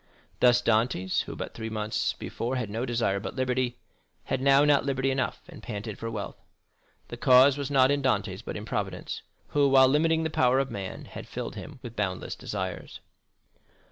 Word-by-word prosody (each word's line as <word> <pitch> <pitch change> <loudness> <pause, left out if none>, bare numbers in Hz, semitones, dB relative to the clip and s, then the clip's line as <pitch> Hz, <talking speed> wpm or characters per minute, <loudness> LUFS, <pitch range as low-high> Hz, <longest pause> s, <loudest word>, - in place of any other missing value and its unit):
Thus 125 0 +5
Dantès, 110 -5 +1
who - - -7
but - - -6
three 110 -1 -5
months 110 0 -1
before 120 +3 -4
had 120 -5 -3
no 115 +4 -2
desire 115 -5 0
but 100 - -6
liberty 130 -1 0 0.5
had 130 - -2
now 140 +1 +5
not 145 -1 +4
liberty 135 -1 0
enough, 130 -1 -2
and 170 -4 -12
panted 105 -2 -6
for 115 - -4
wealth. 105 -3 -6 0.7
The - - -6
cause 130 +2 +6
was 140 -1 -4
not 135 -1 +4
in 145 0 +1
Dantès, 130 - 0
but - - -5
in - - -7
Providence, - - -4 0.3
who, 145 -1 +3
while 135 -1 +7
limiting 160 +4 +2
the 160 - -2
power 130 -3 +3
of 135 -1 0
man, 100 -4 -6
has - - -9
filled - - -5
him 150 - -8
with 120 -2 -8
boundless 95 -3 -2
desires. - - -5
130 Hz, 185 wpm, -27 LUFS, 110-135 Hz, 0.7 s, while